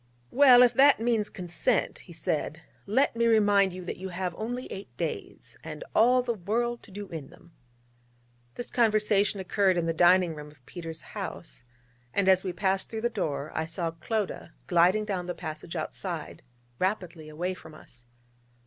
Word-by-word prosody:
'Well, 255 -3 +8
if 245 - +4
that 280 -1 +6
means 225 -2 +1
consent,' 175 -2 -1
he - - -15
said, - - -2 0.3
'let 230 +5 +2
me 235 0 +2
remind 205 -3 +4
you 180 0 -8
that - - -5
you 190 +1 -6
have 180 0 -3
only 245 +7 -4
eight 195 - -7
days, - - -5
and - - -7
all 250 +3 +5
the 240 -1 -1
world 230 +5 -2
to - - -16
do 200 +1 -7
in 160 -4 -7
them.' 170 -1 -19 1.0
This 245 - -5
conversation 210 -3 +2
occurred 190 0 +2
in 170 - 0
the 165 - 0
dining 175 +1 +4
room 150 -1 -9
of 135 -4 -22
Peters' 165 -2 -8
house: - - -6 0.5
and 200 -1 +2
as 190 -1 +5
we 185 - -2
passed 190 +1 0
through 220 -1 -4
the 235 +1 0
door, 150 -8 -3
I 160 0 -2
saw 165 0 -2
Clodagh 200 +6 -3 0.2
gliding 180 +5 +3
down 185 -4 -3
the 180 - -3
passage 160 0 -7
outside 165 0 -5 0.4
rapidly 180 -5 -2
away 175 +5 -3
from 160 -4 -13
us. 125 -5 -17
190 Hz, 175 wpm, -28 LUFS, 170-220 Hz, 1.0 s, Well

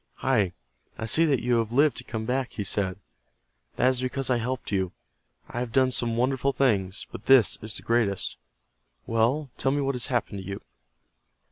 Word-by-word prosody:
"Hi, 95 -4 +1 0.4
I 110 - -4
see 160 +9 +4
that 140 -5 +1
you 120 -1 +3
have 115 -1 -2
lived 145 +4 +4
to - - -2
come 110 -2 -5
back," 130 +2 -1
he 105 - -3
said. 95 -1 -1 0.8
"That 130 - +4
is 130 -1 0
because 130 +1 -2
I 125 - +3
helped 125 0 -3
you. 95 -3 0 0.5
I 120 - -5
have 125 -2 -3
done 130 +1 +3
some 115 -2 0
wonderful 135 +2 +1
things, 105 -7 +1
but - - -9
this 130 -8 +5
is 110 0 -2
the - - -6
greatest. 115 -5 0 0.7
Well, 120 +5 +1
tell 135 - +2
me 145 - 0
what 140 0 0
has 125 -3 -3
happened 120 -6 -1
to 95 - -10
you." 100 0 -5
120 Hz, 195 wpm, -26 LUFS, 110-130 Hz, 0.8 s, this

